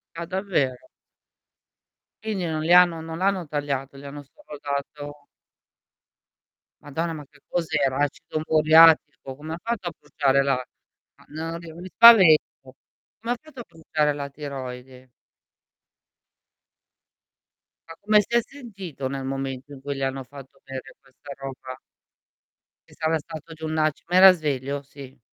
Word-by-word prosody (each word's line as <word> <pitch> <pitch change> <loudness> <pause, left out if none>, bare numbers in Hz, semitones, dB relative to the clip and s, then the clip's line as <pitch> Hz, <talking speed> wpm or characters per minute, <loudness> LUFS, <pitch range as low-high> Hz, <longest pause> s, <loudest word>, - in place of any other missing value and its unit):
Ah, 170 0 -5
davvero? 175 -9 -2 1.4
Quindi 210 -5 -2
non 160 -2 -2
le 170 +2 +3
hanno 180 -2 +6
non 160 0 -7
l'hanno 190 -2 0
tagliata, 140 -2 -3
le 140 +1 -10
hanno 145 +1 -9
solo 150 - -13
dato 145 +1 -6 1.5
Madonna, 160 +3 -3
ma 150 -2 -8
che - - -23
cos'era? 155 -6 0
Acido 145 +2 -2
moriatico? 155 -3 +5
Come 155 +3 -7
ha - - -5
fatto 230 -6 -3
a - - -10
bruciare 140 -2 +1
la 135 -2 0 0.6
ma - - -21
no 165 +2 -5
ri 170 -1 -10
mi 175 +3 -9
spavento? 195 -6 +8 0.8
Come 230 +3 -2
ha - - -7
fatto 310 -4 -14
a - - -8
bruciare 155 -3 -1
la 140 -1 -5
tiroide? 130 -3 -8 2.8
Ma 165 - -9
come 210 +1 +4
si 235 +4 -4
è - - +3
sentito 195 - -8
nel 135 0 -5
momento 135 0 -5
in 140 - -11
cui 140 +1 -4
gli 135 - -6
hanno 135 0 -2
fatto 135 +1 -14
bere 135 -1 -9
questa 135 +1 -15
roba? 130 -1 -8 1.1
Che - - -18
sarà 160 0 +1
stato 160 +1 -10
giù 160 0 -8
un 155 0 -2
aci 155 -1 0
ma 175 - -1
era 190 0 +10
sveglio? 140 -4 -3
Sì. 135 -1 -13
150 Hz, 145 wpm, -24 LUFS, 135-170 Hz, 2.8 s, era